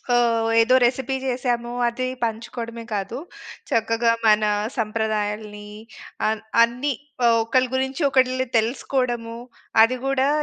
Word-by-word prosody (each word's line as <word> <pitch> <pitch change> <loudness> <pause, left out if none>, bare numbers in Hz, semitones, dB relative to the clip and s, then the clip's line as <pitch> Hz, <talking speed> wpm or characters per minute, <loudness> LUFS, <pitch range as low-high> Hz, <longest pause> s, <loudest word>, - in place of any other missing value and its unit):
ఆహ్, 230 -2 +2
ఏదో 255 +3 +4
రెసిపీ 260 +2 +1
చేసాము. 245 -2 -1 0.2
అది 255 +2 -2 0.2
పంచుకోవడమే 230 +1 -4
కాదు, 200 +4 -3 0.5
చక్కగా 230 +1 +2 0.2
మన 215 0 +5 0.3
సంప్రదాయాల్ని 215 -1 -2 0.6
ఆహ్, 220 -1 -2 0.2
అన్ని 250 +5 -1 0.5
ఒకళ్ళ 255 +3 +2
గురించి 265 +4 -1
ఒకళ్ళు 260 0 +2
తెలుసుకోవడము. 235 0 -1 0.5
అది 255 +3 +2
కూడా 270 0 +2
235 Hz, 105 wpm, -23 LUFS, 225-255 Hz, 0.6 s, మన